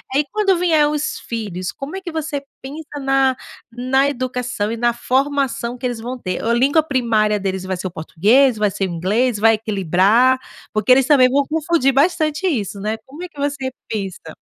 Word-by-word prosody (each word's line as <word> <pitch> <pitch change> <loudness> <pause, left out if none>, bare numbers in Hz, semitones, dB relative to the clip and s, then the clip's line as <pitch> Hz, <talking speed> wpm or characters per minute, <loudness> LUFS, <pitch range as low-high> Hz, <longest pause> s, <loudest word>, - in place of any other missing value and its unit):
aí 290 - +4
quando 395 -3 +2
vier 320 -4 +3
os 300 0 -2
filhos, 200 -6 -4
como 275 +6 -7
é 385 - -5
que 350 -3 -6
você 310 -2 -3 0.2
pensa 290 +2 -8
na 270 -1 +2 0.4
na 255 +3 +1
educação 250 -5 -3
e 230 - -3
na 240 0 +1
formação 260 -2 -1
que 250 - -6
eles 240 -2 -2
vão 250 +3 -5
ter, 185 -6 -4
a 230 - +1
língua 275 +6 +3
primária 230 -7 +1
deles 190 -1 -3
vai 185 -1 -3
ser 185 - -7
o - - -7
português, 215 - +2
vai 210 -1 +1
ser 195 - -2
o - - -5
inglês, 210 +7 0
vai 225 +2 +5
equilibrar? 215 +5 +2 0.3
Porque 215 +3 +1
eles 260 0 +6
também 260 -3 +5
vão 280 +2 +2
confundir 315 -3 +1
bastante 310 +3 +1
isso, 210 - -2
né. 215 +2 -2
Como 290 +6 -11
é - - -5
que 295 - -24
você 280 -2 -2 0.2
pensa? 190 -7 -5
255 Hz, 195 wpm, -19 LUFS, 215-285 Hz, 0.4 s, eles